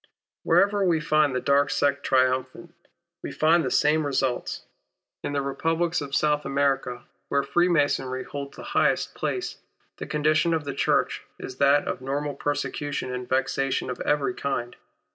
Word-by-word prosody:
Wherever 200 Hz, 0 st, +3 dB
we 170 Hz, -4 st, +2 dB
find 150 Hz, -2 st, +2 dB
the -, -, +1 dB
dark 140 Hz, +1 st, +2 dB
sect 140 Hz, 0 st, +1 dB
triumphant 130 Hz, +5 st, 0 dB, 0.5 s
we -, -, -5 dB
find 165 Hz, +2 st, +3 dB
tlie 130 Hz, -, -2 dB
same 155 Hz, +1 st, +3 dB
results. 135 Hz, -3 st, -1 dB, 0.6 s
In -, -, -3 dB
the 140 Hz, -1 st, 0 dB
Republics 165 Hz, +4 st, 0 dB
of 140 Hz, -1 st, -4 dB
South 150 Hz, -1 st, +2 dB
America, 135 Hz, -3 st, 0 dB, 0.3 s
where 140 Hz, 0 st, +1 dB
Freemasonry 140 Hz, -4 st, +1 dB
holds 140 Hz, -1 st, -7 dB
the -, -, -8 dB
highest -, -, +2 dB
places, 375 Hz, -, -3 dB, 0.4 s
the -, -, -6 dB
condition 155 Hz, +2 st, +2 dB
of 160 Hz, -, -2 dB
the 140 Hz, -1 st, -4 dB
Church -, -, +1 dB, 0.2 s
is 130 Hz, -, -8 dB
that 140 Hz, +1 st, +3 dB
of -, -, -3 dB
normal 140 Hz, +2 st, -2 dB
persecution 145 Hz, -1 st, -3 dB
and 125 Hz, 0 st, -5 dB
vexation 135 Hz, 0 st, 0 dB
of 125 Hz, -, -6 dB
every 145 Hz, +4 st, +1 dB
kind. 125 Hz, -6 st, -3 dB
140 Hz, 155 wpm, -25 LUFS, 135-155 Hz, 0.6 s, Wherever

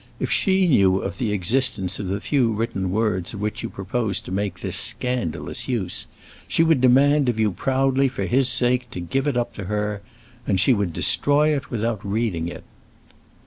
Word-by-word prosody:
If -, -, -2 dB
she 190 Hz, -2 st, +3 dB
knew 95 Hz, -, +4 dB
of -, -, -5 dB
the 115 Hz, -5 st, -1 dB
existence 105 Hz, -1 st, 0 dB
of 100 Hz, -, -4 dB
the 100 Hz, +2 st, -2 dB
few 125 Hz, -2 st, +1 dB
written 105 Hz, -4 st, -2 dB
words 105 Hz, -1 st, -1 dB
of -, -, -7 dB
which 105 Hz, 0 st, -3 dB
you -, -, -4 dB
propose 100 Hz, +1 st, -2 dB
to -, -, -10 dB
make 95 Hz, -2 st, -2 dB
this -, -, -3 dB
scandalous 125 Hz, -10 st, -2 dB
use, 105 Hz, -8 st, -1 dB, 0.4 s
she 165 Hz, -, +2 dB
would 160 Hz, -5 st, +3 dB
demand 135 Hz, +2 st, +4 dB
of 115 Hz, -2 st, -1 dB
you 110 Hz, -2 st, +2 dB
proudly 135 Hz, +6 st, +1 dB
for 125 Hz, -7 st, -3 dB
his 130 Hz, +4 st, +2 dB
sake 125 Hz, 0 st, +2 dB
to 90 Hz, -, -7 dB
give 135 Hz, -, -2 dB
it 140 Hz, -4 st, 0 dB
up 120 Hz, -, -1 dB
to 100 Hz, -, -5 dB
her, 105 Hz, +1 st, -2 dB, 0.5 s
and 95 Hz, -3 st, +1 dB
she 100 Hz, +7 st, +4 dB
would 100 Hz, -5 st, -1 dB
destroy 150 Hz, -, +3 dB
it 135 Hz, -3 st, -5 dB
without 115 Hz, -2 st, -2 dB
reading 100 Hz, -5 st, -1 dB
it." 85 Hz, -, -8 dB
115 Hz, 190 wpm, -22 LUFS, 100-130 Hz, 0.5 s, knew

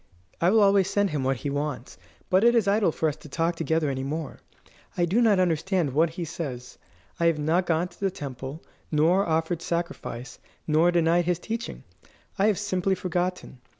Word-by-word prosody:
I 170 Hz, -, +4 dB
will 220 Hz, +2 st, +4 dB
always 195 Hz, -2 st, +4 dB
send 200 Hz, -1 st, +1 dB
him 145 Hz, -3 st, -1 dB
what 135 Hz, 0 st, 0 dB
he 140 Hz, +4 st, -4 dB
wants, 145 Hz, -3 st, -4 dB, 0.3 s
but 185 Hz, +3 st, +4 dB
it 235 Hz, +1 st, +5 dB
is 225 Hz, -4 st, +3 dB
idle 200 Hz, -3 st, +3 dB
for 160 Hz, -, -1 dB
us 150 Hz, -, -1 dB
to 150 Hz, -, -13 dB
talk 165 Hz, +4 st, 0 dB
together 160 Hz, -1 st, 0 dB
any 135 Hz, -1 st, -2 dB
more. 150 Hz, +3 st, -4 dB, 0.6 s
I 175 Hz, -, +3 dB
do 200 Hz, +8 st, +2 dB
not 215 Hz, -5 st, +4 dB
understand 175 Hz, -3 st, +1 dB
what 160 Hz, +3 st, +3 dB
he 170 Hz, +1 st, -5 dB
says. 135 Hz, -6 st, -6 dB, 0.4 s
I 170 Hz, -, +3 dB
have 165 Hz, -2 st, +2 dB
not 165 Hz, +5 st, +1 dB
gone 170 Hz, +1 st, +1 dB
to 175 Hz, -, -21 dB
the 195 Hz, -, +1 dB
temple, 140 Hz, -2 st, -7 dB, 0.3 s
nor 170 Hz, +6 st, +3 dB
offered 160 Hz, +1 st, 0 dB
sacrifice, 170 Hz, -9 st, -4 dB, 0.3 s
nor 160 Hz, +3 st, +3 dB
denied 170 Hz, 0 st, +2 dB
his 175 Hz, -1 st, +1 dB
teaching. 230 Hz, +6 st, -5 dB, 0.6 s
I 200 Hz, -, +4 dB
have 210 Hz, -4 st, +2 dB
simply 190 Hz, -2 st, 0 dB
forgotten. 180 Hz, -6 st, -3 dB
170 Hz, 190 wpm, -26 LUFS, 150-185 Hz, 0.6 s, it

